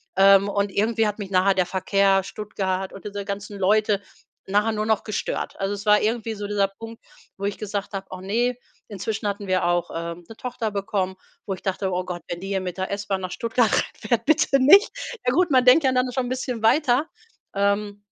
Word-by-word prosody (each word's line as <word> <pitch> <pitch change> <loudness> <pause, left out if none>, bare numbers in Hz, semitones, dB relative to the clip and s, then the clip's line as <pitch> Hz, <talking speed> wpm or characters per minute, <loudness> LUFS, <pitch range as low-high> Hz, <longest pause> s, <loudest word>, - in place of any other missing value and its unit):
Ähm, 195 +1 +6
und 200 0 -1
irgendwie 225 +2 +1
hat 210 +1 -4
mich 200 -2 -5
nachher 190 +1 +4
der 185 -1 +1
Verkehr, 195 +1 +2
Stuttgart 195 -2 -3
und 195 - -11
diese 205 -1 -5
ganzen 200 0 -6
Leute 210 +1 +2 0.5
nachher 210 +3 +2
nur 215 0 -1
noch 220 -1 +1
gestört. 215 - -4
Also, 195 +1 -1
es 205 +1 -7
war 210 0 +6
irgendwie 225 0 -1
so 205 0 -5
dieser 200 -1 +1
Punkt, 225 +3 -11 0.3
wo 195 - -10
ich 200 - -2
gesagt 205 -1 -4
habe: 195 0 -4
„Och 185 - -7
ne“. 235 +6 0 0.3
Inzwischen 210 +1 -4
hatten 200 0 -3
wir 185 -1 +1
auch, 175 0 +1
ähm, 170 +1 -5
'ne 225 - -11
Tochter 235 -3 -3
bekommen, 200 -2 -2 0.3
wo 195 - -1
ich - - -16
dachte: 190 0 -1
„Oh 180 0 -1
Gott, 175 -1 -5
wenn 175 - -4
die 195 - -7
hier 190 -1 -1
mit 180 -1 -5
der 190 0 -3
S-Bahn 200 -1 -2
nach 185 -1 -5
Stuttgart 230 -1 +1
reinfährt, 230 +1 -1
bitte 275 -3 +3
nicht!“ 390 - +7 0.3
Ja 250 - +2
gut, 355 +2 +3
man 255 -2 +4
denkt 265 +5 +7
ja 265 - +3
dann 255 0 +1
schon 255 -1 -1
'n - - -5
bisschen 255 -3 -3
weiter, 265 +4 +3 0.5
ähm, 205 0 0
205 Hz, 215 wpm, -23 LUFS, 195-225 Hz, 0.5 s, nicht